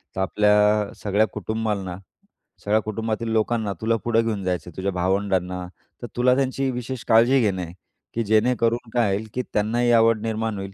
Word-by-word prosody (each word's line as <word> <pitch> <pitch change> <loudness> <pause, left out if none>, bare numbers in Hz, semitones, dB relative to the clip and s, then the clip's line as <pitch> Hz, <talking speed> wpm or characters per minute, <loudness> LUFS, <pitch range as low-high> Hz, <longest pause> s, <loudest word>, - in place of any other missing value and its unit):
तर 95 - -1
आपल्या 105 +1 +3
सगळ्या 105 +1 +2
कुटुंबाला, 105 -3 -3 0.7
सगळ्या 105 +1 +3
कुटुंबातील 110 +1 -3
लोकांना 110 -2 0
तुला 115 +1 +1
पुढं 115 -1 +3
घेऊन 105 -4 -2
जायचं 90 -1 -2
आहे, 85 - -16
तुझ्या 95 +1 -1
भावंडांना. 90 -1 -1 0.4
तर 120 - -5
तुला 125 +1 +4
त्यांची 135 0 0
विशेष 125 0 -5
काळजी 120 +4 +5
घेणं 95 -5 0
आहे 85 0 -7 0.4
की 115 - -1
जेणेकरून 115 +2 +1
काय 115 -5 +2
होईल, 110 +2 -5
की 125 - -1
त्यांनाही 120 +3 +1
आवड 115 -1 +4
निर्माण 110 -1 -2
होईल. 95 0 -7
110 Hz, 170 wpm, -23 LUFS, 100-115 Hz, 0.7 s, काळजी